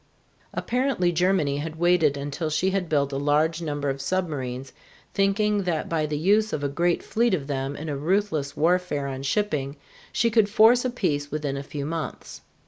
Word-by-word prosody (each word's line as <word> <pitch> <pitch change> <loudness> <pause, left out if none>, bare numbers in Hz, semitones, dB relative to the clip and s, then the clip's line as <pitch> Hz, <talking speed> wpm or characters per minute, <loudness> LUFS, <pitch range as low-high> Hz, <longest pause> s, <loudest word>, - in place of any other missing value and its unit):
Apparently 245 -8 0
Germany 175 -5 +1
had 155 +2 -4
waited 165 -4 +3
until 145 +3 -3
she 180 +5 +1
had 190 -3 -1
built 140 -2 +1
a - - -1
large 150 +3 +1
number 145 -3 -3
of 135 0 -2
submarines, 135 -6 -3 0.4
thinking 205 +1 +2
that 175 -5 -1
by 155 -2 0
the 150 0 -2
use 210 +7 +2
of 145 - -2
a - - +2
great 170 +4 0
fleet 235 -3 +1
of 145 -6 -5
them 135 0 -3
in 155 +3 -6
a 145 - -2
ruthless 155 -2 -1
warfare 170 -3 +1
on 135 -1 -4
shipping 140 -3 -1 0.4
she 230 - +1
could 215 -2 +4
force 225 +4 +5
a 255 - 0
peace 150 -12 -1
within 145 -2 -2
a 140 - -3
few 140 0 -5
months. 160 0 -5
160 Hz, 185 wpm, -25 LUFS, 145-190 Hz, 0.4 s, force